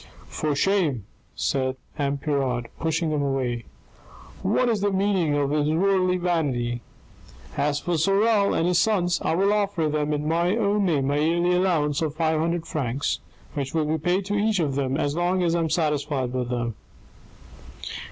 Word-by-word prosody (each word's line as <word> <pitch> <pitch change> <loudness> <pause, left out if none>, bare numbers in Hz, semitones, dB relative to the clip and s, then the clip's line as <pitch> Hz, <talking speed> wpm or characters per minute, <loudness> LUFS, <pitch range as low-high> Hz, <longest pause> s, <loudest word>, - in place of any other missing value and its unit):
" - - -20
For 150 -2 0
shame," 155 - +1 0.3
said 130 -1 0 0.2
M. 140 -1 -1
Pirard, 135 -5 -1
pushing 165 0 0
him 150 -1 0
away. 130 -4 -1 0.4
" - - -20 0.2
What 255 - +3
is 220 -4 +1
the 205 - +2
meaning 190 -6 +1
of 145 -1 0
this 150 0 +1
worldly 185 +3 +2
vanity? 140 -9 -1 0.7
As 145 0 0
for 175 0 -1
Sorel 200 +3 +3
and 165 - +1
his 180 -1 +3
sons, 180 -4 +1
I - - 0
will 195 +3 +3
offer 200 -6 0
them 150 0 -1
in 150 0 -1
my 170 +5 +1
own 205 -2 +1
name 140 -5 +1
a 145 - +1
yearly 170 +3 +2
allowance 165 -6 +1
of 155 -2 -2
five 160 -1 +1
hundred 170 +1 -1
francs, 140 -4 -2 0.3
which 140 0 -4
will 160 -1 +2
be 155 +1 0
paid 180 +5 0
to 200 - -3
each 210 0 +2
of 150 -5 0
them 135 -1 -1
as 145 -1 -1
long 180 +2 +1
as 170 -1 +2
I 170 - +1
am 165 -1 0
satisfied 150 -5 0
with 125 -2 -2
them." 120 -2 -2
160 Hz, 180 wpm, -24 LUFS, 140-180 Hz, 0.7 s, What